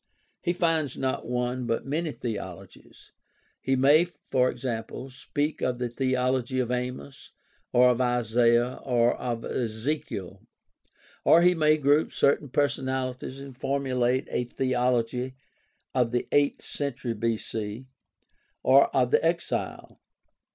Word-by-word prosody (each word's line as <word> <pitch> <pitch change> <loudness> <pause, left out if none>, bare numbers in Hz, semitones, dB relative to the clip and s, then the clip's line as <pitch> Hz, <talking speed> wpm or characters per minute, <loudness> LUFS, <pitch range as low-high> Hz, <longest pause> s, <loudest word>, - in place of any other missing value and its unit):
He 175 - 0
finds 165 -6 0
not 130 -1 -2
one, 125 0 -2
but 115 0 -1
many 155 +3 -1
theologies. 100 -9 -8 0.5
He 135 - 0
may, 140 +4 +6
e.g., 125 -7 -2
speak 145 +4 -3
of 125 -1 0
the 125 -1 -2
theology 130 0 0
of 125 -1 -1
Amos, 125 +2 -5 0.4
or 125 +1 +6
of 125 +1 0
Isaiah, 120 0 +2
or 120 -2 +2
of 120 -2 -4
Ezekiel, 110 - -3 0.8
or 170 - +6
he 180 0 +6
may 155 -2 +3
group 145 +1 +3
certain 140 0 +2
personalities 130 -1 -1
and 140 -1 -9
formu 135 0 -2
late 125 +2 +1
a 125 - 0
theology 125 0 0 0.6
of 125 -3 +2
the 120 +1 -1
eighth 145 0 +2
century 135 -4 -3
B.C., 110 +1 -3 0.8
or 135 +2 +6
of 125 -2 +2
the - - +3
Exile. 170 +1 -2
130 Hz, 125 wpm, -27 LUFS, 120-140 Hz, 0.8 s, may